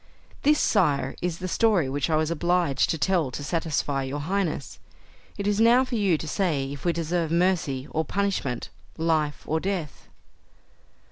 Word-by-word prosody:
"This, 300 +1 +4
Sire, 145 - +2
is 175 -2 -2
the 185 - -4
story 200 - +2
which 140 +3 -1
I 160 - +2
was 155 +1 +1
obliged 170 -4 +1
to 165 - 0
tell 170 -3 +1
to 135 +3 -6
satisfy 150 -3 -1
your 135 +2 -4
highness. 170 -3 -2 0.6
It 200 - -3
is 205 +1 +1
now 240 +3 +5
for 255 - -8
you 200 -7 +2
to 155 - -7
say 150 -6 -1
if 145 - -10
we 175 - +3
deserve 170 0 -1
mercy 165 -6 +1
or 160 - 0
punishment; 185 -9 -2 0.3
life 160 -2 0
or 160 - 0
death?" 180 -5 -4
165 Hz, 165 wpm, -25 LUFS, 145-190 Hz, 0.6 s, now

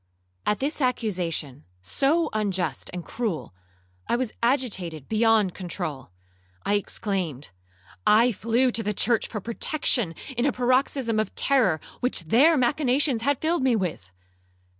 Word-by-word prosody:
At 210 - +1
this 295 +3 -2
accusation, 180 - -2 0.2
so 300 - +1
unjust 200 -4 -1
and 180 -1 -6
cruel, 170 - -3 0.6
I - - +3
was 245 -2 -1
agitated 205 - 0
beyond 220 -4 +3
controul. 170 - -5 0.6
I 200 - +1
exclaimed, 185 - -2 0.6
'I 230 +4 +6
flew 230 +4 +1
to 230 - -1
the 210 -1 -2
church 235 +2 +2
for 215 - -5
protection 235 - 0 0.2
in 240 +3 +1
a - - +3
paroxysm 255 -2 +1
of 215 - -2
terror, 230 - +2 0.2
which 250 -6 0
their 265 - +4
machinations 260 0 +2
had 280 +2 0
filled 330 0 +1
me 260 -2 +3
with! 165 - -3
225 Hz, 135 wpm, -25 LUFS, 185-255 Hz, 0.6 s, I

